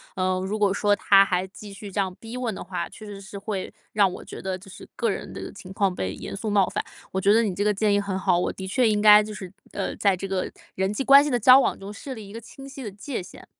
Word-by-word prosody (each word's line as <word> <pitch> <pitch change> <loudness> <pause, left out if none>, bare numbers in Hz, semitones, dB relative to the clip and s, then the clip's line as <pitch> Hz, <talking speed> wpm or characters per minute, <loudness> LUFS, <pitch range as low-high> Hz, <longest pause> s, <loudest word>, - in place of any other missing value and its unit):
呃， 185 0 0
如 210 +3 -2
果 200 -2 +3
说 205 0 +2
他 195 0 +6
还 185 -1 0
继 205 +1 -11
续 200 +1 -9
这 200 - -3
样 190 -2 0
逼 225 +2 -8
问 240 -3 -2
的 - - -7
话， 180 0 -4
确 215 - -12
实 200 -1 -8
是 200 +1 -9
会 195 -2 -4 0.2
让 200 -3 +4
我 - - -8
觉 - - -9
得 190 -1 -3
就 195 +1 -15
是 - - -12
个 230 -2 0
人 195 - -4
的 - - -7
情 190 -1 -11
况 195 -2 +1
被 95 - -3
严 - - -7
肃 215 +2 -4
冒 200 -2 +3
犯， - - -3 0.3
我 190 - -1
觉 200 - +4
得 230 - +5
你 195 -4 -2
这 205 - 0
个 210 0 +2
建 205 0 +1
议 205 - +3
很 195 -2 -3
好， 185 -2 +2
我 180 - 0
的 190 0 -7
确 240 +4 +2
应 210 -1 +1
该 210 0 +8
就 215 0 -7
是， 190 -3 -8 0.2
呃， - - -3
在 195 -3 +2
这 195 - -5
个 190 -1 -2 0.2
人 190 +1 0
际 210 +6 -2
关 275 +1 +8
系 295 - -1
的 245 - +1
交 255 +4 +8
往 - - 0
中 200 +2 -8
设 265 +6 -7
立 220 -4 -9
一 200 - -12
个 230 - -7
清 270 +4 -12
晰 270 -1 -9
的 210 - -5
界 205 +1 -5
限。 - - -13
200 Hz, 320 characters per minute, -25 LUFS, 190-215 Hz, 0.3 s, 该